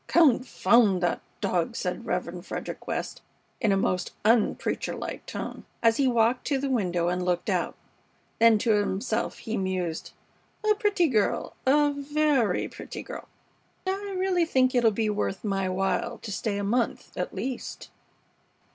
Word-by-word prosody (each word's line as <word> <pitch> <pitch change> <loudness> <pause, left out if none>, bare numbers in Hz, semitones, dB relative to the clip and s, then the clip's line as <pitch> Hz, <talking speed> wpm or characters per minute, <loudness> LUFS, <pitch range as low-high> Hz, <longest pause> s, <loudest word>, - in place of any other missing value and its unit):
"Confound 235 - +4
that 175 - +1 0.2
dog!" - - 0
said - - -3
Rev. - - -2
Frederick - - -6
West, - - -3 0.4
in 220 -4 +2
a 195 - +3
most 185 -2 0
unpreacher 225 0 +2
like - - -5
tone, - - -5 0.2
as 225 -1 +5
he 275 - +3
walked 235 0 +2
to 280 - +2
the 275 0 -2
window 180 -8 +1
and 180 +1 0
looked 180 -1 0
out. - - 0 0.6
Then 230 -1 +7
to 225 +2 +1
himself 210 +2 0
he 225 0 -4
mused: 185 -4 -2 0.5
"A 425 - +6
pretty 410 -4 +2
girl. 215 -7 +1
A 290 +2 +5
very 285 -7 +1
pretty - - -8
girl. - - -8 0.6
I 390 +1 -2
really 370 -2 +2
think 260 -5 +2
it'll 240 -3 +5
be 220 +1 -1
worth 205 -2 -2
my 195 -3 0
while 195 +5 -1
to 215 - -5
stay 205 +1 -2
a 200 - -2
month 235 +4 -1
at - - -3
least." 260 -1 -5
230 Hz, 155 wpm, -27 LUFS, 195-275 Hz, 0.6 s, Then